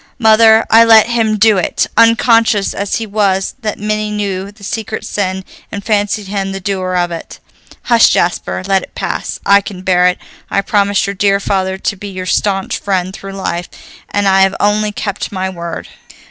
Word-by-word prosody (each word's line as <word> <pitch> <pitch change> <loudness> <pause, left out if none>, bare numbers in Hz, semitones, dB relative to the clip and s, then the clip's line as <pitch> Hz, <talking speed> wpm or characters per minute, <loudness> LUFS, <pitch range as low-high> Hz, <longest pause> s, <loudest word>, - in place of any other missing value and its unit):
Mother, 220 -1 +5
I 225 +1 +7
let 225 0 +6
him 225 -2 +1
do 210 -2 +4
it, - - 0
unconscious 230 -2 +3
as 200 0 -3
he 225 - -3
was 200 -2 0
that 215 -2 -3
many 215 0 -2
knew 200 -2 -3
the 205 0 -19
secret 215 +1 -5
sin 190 -2 -3 0.3
and 200 -1 -6
fancied 210 -1 0
him 195 0 -3
the 195 - -5
doer 185 -1 -3
of 175 -1 0
it." 165 - -8 0.5
"Hush, 235 -2 +5
Jasper, 175 +1 -1
let 195 -1 +2
it - - -13
pass. - - -4
I 200 0 +5
can 190 -2 -9
bear 180 -1 +3
it; 180 - 0 0.3
I 195 - +1
promised 200 0 +1
your 200 - -3
dear 200 0 +1
father 190 -1 -1
to 200 - -2
be 205 +1 -8
your 185 -2 -6
staunch 195 +1 -1
friend 190 -2 -2
through 195 0 -9
life, 175 -3 -4 0.4
and 205 -1 0
I 190 0 +4
have 190 0 +3
only 210 +1 +1
kept 205 -1 -4
my 190 -1 -3
word." 170 -2 -7
200 Hz, 190 wpm, -14 LUFS, 190-215 Hz, 0.5 s, I